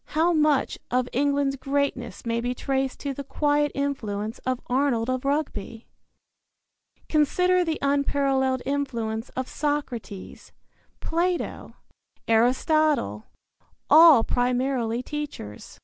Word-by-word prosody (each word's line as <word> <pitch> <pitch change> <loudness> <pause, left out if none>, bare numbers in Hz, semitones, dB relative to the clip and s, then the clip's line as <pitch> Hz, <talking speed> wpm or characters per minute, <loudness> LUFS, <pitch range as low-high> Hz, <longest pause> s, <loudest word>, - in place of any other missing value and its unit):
How 340 +2 +4
much 300 -3 +2
of 250 0 +1
England's 280 +1 +1
greatness 275 -3 -2
may 230 0 -1
be 245 +1 -2
traced 270 0 -2
to 280 -1 -3
the 280 - -6
quiet 295 +1 +1
influence 225 -6 -3
of 255 -1 0
Arnold 255 -2 +1
of 255 +1 -3
Rugby! 275 -6 -2 1.2
Consider 360 +4 +2
the 325 -2 -2
unparalleled 275 -2 +1
influence 235 -5 -2
of 260 0 -2
Socrates, 255 -10 -4 0.5
Plato, 345 +2 -2 0.5
Aristotle 245 - +2 0.7
all 315 -7 +8
primarily 245 -1 0
teachers. 290 - -7
275 Hz, 100 wpm, -25 LUFS, 245-290 Hz, 1.2 s, all